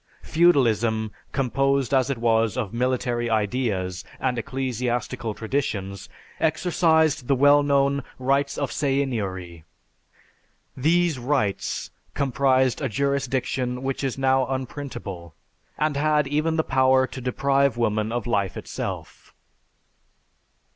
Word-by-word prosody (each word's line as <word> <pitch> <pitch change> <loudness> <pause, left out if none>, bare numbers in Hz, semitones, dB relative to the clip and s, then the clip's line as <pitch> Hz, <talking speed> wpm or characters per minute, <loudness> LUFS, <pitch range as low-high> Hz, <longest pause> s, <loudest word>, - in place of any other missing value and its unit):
Feudalism, 115 -10 +2 0.2
composed 135 0 +1
as 130 -1 +3
it 135 - -1
was 115 0 +1
of 115 -5 -3
military 120 -1 0
ideas 105 -5 -1 0.2
and 130 -1 0
ecclesiastical 125 -2 -3
traditions, 110 -6 -3 0.3
exercised 160 -4 +2
the 140 - +3
well 145 +2 +6
known 140 -1 +2 0.2
"rights 135 +2 0
of 140 -3 -2
seigniory." 100 - -2 1.1
These 165 +1 +2
"rights" 120 -6 -1 0.2
comprised 130 -2 +2
a 135 - -1
jurisdiction 130 0 -1
which 135 +1 -2
is 135 -2 -2
now 130 -1 +2
unprintable, 120 - -6 0.4
and 150 -1 0
had 150 0 +2
even 155 +3 0
the 160 - +2
power 130 0 +3
to 130 - -8
deprive 135 0 +1
woman 110 -2 0
of 120 -2 -2
life 100 -6 -1
itself. - - -6
130 Hz, 110 wpm, -24 LUFS, 115-140 Hz, 1.1 s, well